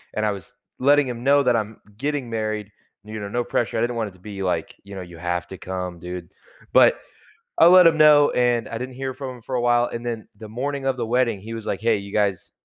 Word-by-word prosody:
and 110 - 0
I 105 - +2
was 95 -4 -9 0.3
letting 145 +1 +4
him 120 -1 -5
know 140 +1 +4
that 125 -2 +3
I'm 110 -1 -2 0.2
getting 140 -1 -2
married, 110 -2 -3 0.3
you 110 +1 -7
know, 100 - -5
no 120 +4 -1
pressure, 120 -1 -1
I 110 - +1
didn't 120 0 0
want 110 -3 -2
it - - -18
to 95 - -20
be, 100 0 -7
like, 90 -3 -2
you 100 0 -10
know, 95 - -5
"You 85 -2 -11
have 90 +1 -3
to 95 - -8
come, 90 -1 -5
dude." 90 +1 -7 0.4
But, - - +6 0.6
I - - +8
let 180 -1 +8
him 160 - +3
know 150 -1 +7
and 120 -2 +1
I 115 - -4
didn't 130 +2 -6
hear 130 -1 -4
from 130 -2 -7
him - - -17
for 130 +3 -5
a 125 - +1
while, 120 0 +3
and 120 +1 -6
then 115 -2 -4
the 110 +1 -10
morning 135 +4 -3
of 135 -1 +1
the 120 - -2
wedding, 120 -3 +1
he 115 +3 -7
was, 110 -1 -7
like, 100 - -3
"Hey, 115 -1 +2
you 100 0 -9
guys, 100 -4 0
115 Hz, 260 wpm, -23 LUFS, 100-130 Hz, 0.6 s, I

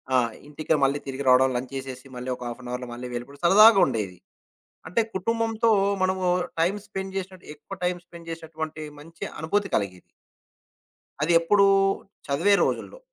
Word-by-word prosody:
ఆ! - - +6 0.3
ఇంటికి 155 +2 -1
మళ్ళీ 140 +2 +2
తిరిగి 135 +1 -4
రావడం, 130 +1 +6
లంచ్ 125 +2 -4
చేసేసి 130 -1 -7
మళ్ళీ 125 +1 -5
ఒక 125 - -10
హాఫ్ 120 +1 -7
ఎన్ 125 - -9
అవర్‌లో 125 0 -4
మళ్ళీ 120 +1 -6
వెళ్ళిపోవడం. 125 +4 -7
సరదాగా 215 +4 +8
ఉండేది. 105 -8 -3 0.7
అంటే, 180 +8 +1
కుటుంబంతో 225 +3 0 0.3
మనము 185 0 0 0.4
టైమ్ 180 +5 +2
స్పెండ్ 190 0 -6
చేసినట్టు 185 -1 -6
ఎక్కువ 150 +6 -10
టైమ్ 180 0 0
స్పెండ్ 170 -2 -13
చేసినటువంటి 160 -1 -6 0.2
మంచి 165 +3 -9 0.2
అనుభూతి 200 +6 0
కలిగేది. 95 -3 -1 1.2
అది 160 +3 +2
ఎప్పుడూ, 200 +4 +4 0.6
చదివే 165 +9 +3
రోజుల్లో. - - -3
160 Hz, 150 wpm, -25 LUFS, 130-190 Hz, 1.2 s, సరదాగా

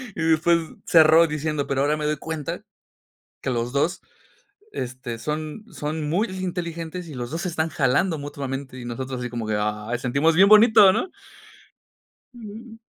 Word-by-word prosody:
Y 165 - -4
después 165 +1 +3 0.3
cerró 160 0 +6
diciendo: 150 -1 -2
"Pero 135 0 0
ahora 150 +2 +1
me 150 - -3
doy 150 0 0
cuenta 160 -1 -5 0.8
que - - -2
los 120 0 -2
dos, 145 +5 0 0.7
este, 125 -2 -5
son 155 - -5
son 150 -1 -4
muy 200 +8 +1
inteligentes 175 -2 -5
y 145 - -8
los 120 +1 -5
dos 165 - -3
se 180 - -1
están 160 0 -1
jalando 155 +5 +1
mutuamente". 135 -2 -6
Y 120 - -8
nosotros 130 +2 -5
así 125 0 -4
como 120 -2 -4
que, 105 -1 0
"ay", 105 +3 -2
sentimos 140 +6 +1
bien 195 +3 +6
bonito, 215 -3 +7
¿no? 370 - -1 1.3
Mm. 225 0 -10
155 Hz, 165 wpm, -23 LUFS, 130-170 Hz, 1.3 s, bonito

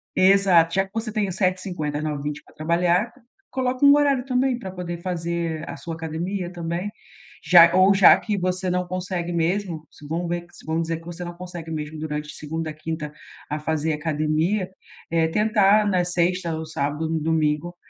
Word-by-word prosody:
exato. 185 -3 +5
Já 195 0 +2
que 190 - -21
você 225 0 -3
tem 210 -2 0
os 180 - -5
7h50 185 -6 -1
às - - -4
9h20 150 -1 -3
pra - - -21
trabalhar, 175 +6 +1 0.4
coloca 255 +1 0
um 280 0 +8
horário 280 -3 +2
também 255 -1 +1
pra 190 -6 -6
poder 180 -2 -5
fazer 170 -2 -3
a - - -5
sua 165 -1 -6
academia 175 +3 -4
também, 175 +2 -3 0.5
já 170 -1 +8
ou 190 +2 +6
já 195 -1 +8
que 210 -2 -2
você 185 0 -1
não 180 0 -1
consegue 180 -1 -3
mesmo, 170 -1 -1
se 150 - -13
vamos 170 +3 -2
ver, 175 0 -2 0.2
vamos 160 +1 0
dizer 165 0 -2
que 165 - -17
você 175 +1 -7
não 175 - -6
consegue 175 -2 -8
mesmo 155 0 -5
durante 150 -1 -4
segunda 160 +1 -4
a - - -9
quinta 155 -1 -5 0.4
a 150 - -2
fazer 160 +1 -1
academia, 155 +5 0 0.4
eh, 165 -1 +3
tentar 210 +2 +3
na 185 -3 +2
sexta 175 -1 0
ou 160 0 -5
sábado 150 0 -2
ou - - -2
no 165 - 0
domingo, 155 +1 0
170 Hz, 190 wpm, -23 LUFS, 160-185 Hz, 0.5 s, um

